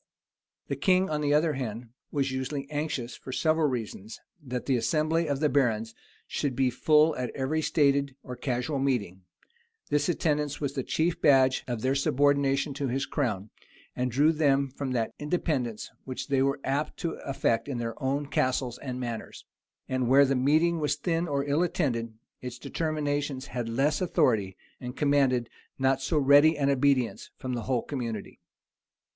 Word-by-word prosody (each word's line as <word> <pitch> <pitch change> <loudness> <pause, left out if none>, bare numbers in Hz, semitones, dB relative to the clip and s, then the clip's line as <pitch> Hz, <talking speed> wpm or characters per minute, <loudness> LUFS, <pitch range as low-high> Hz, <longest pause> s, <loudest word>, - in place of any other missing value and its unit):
The - - -2
king, 185 -2 +2
on 150 0 -1
the 145 -1 +1
other 155 +1 +2
hand, 120 -3 -5 0.2
was 140 -2 0
usually 135 +2 -3
anxious, 145 -5 -3
for 130 - -9
several 155 +3 +2
reasons, 110 -4 -5 0.2
that 125 -2 -4
the 135 - +2
assembly 155 +5 +1
of 140 0 -1
the 150 - +4
barons 115 -6 +1 0.3
should 140 -4 -2
be 130 -1 +2
full 155 +4 +4
at 125 -1 -2
every 145 +4 -1
stated 140 -3 +2
or 125 - -7
casual 125 +2 -2
meeting: 115 -9 -1 0.7
this 145 +1 +2
attendance 150 -3 0
was 140 -2 -2
the 135 - -2
chief 165 +6 -1
badge 130 -3 +4
of 120 -3 -3
their 130 +1 +2
subordination 140 +1 +2
to 140 0 -2
his 135 +2 -1
crown, 110 -8 -2 0.4
and 125 0 -1
drew 145 +6 +4
them 140 -3 +2
from 135 -1 -4
that 115 -3 0
independence 145 -8 -2
which 130 +2 -6
they 135 -1 +2
were 140 +1 +1
apt 140 +3 -1
to 170 - -1
affect 115 -4 -1
in 135 -4 -3
their 115 -1 -3
own 140 +2 0
castles 130 -3 -1
and 130 -2 -5
manors; 120 -3 -6 0.4
and 130 -1 -1
where 140 +2 +7
the 135 0 +1
meeting 155 +6 +3
was 150 -1 +1
thin 165 +2 -1
or 140 -2 -1
ill 145 +3 +1
attended, 120 -10 -1 0.3
its 125 -1 -6
determinations 145 -2 -2
had 120 -2 -2
less 140 +7 +1
authority, 115 - +1 0.2
and 125 +1 -7
commanded 135 -5 +2 0.3
not 135 0 +2
so 150 +4 0
ready 145 +2 +6
an 140 -1 +2
obedience 135 -3 +1
from 130 -1 -4
the 120 - -2
whole 125 -3 +1
community. 115 -7 -5
135 Hz, 170 wpm, -28 LUFS, 125-150 Hz, 0.7 s, where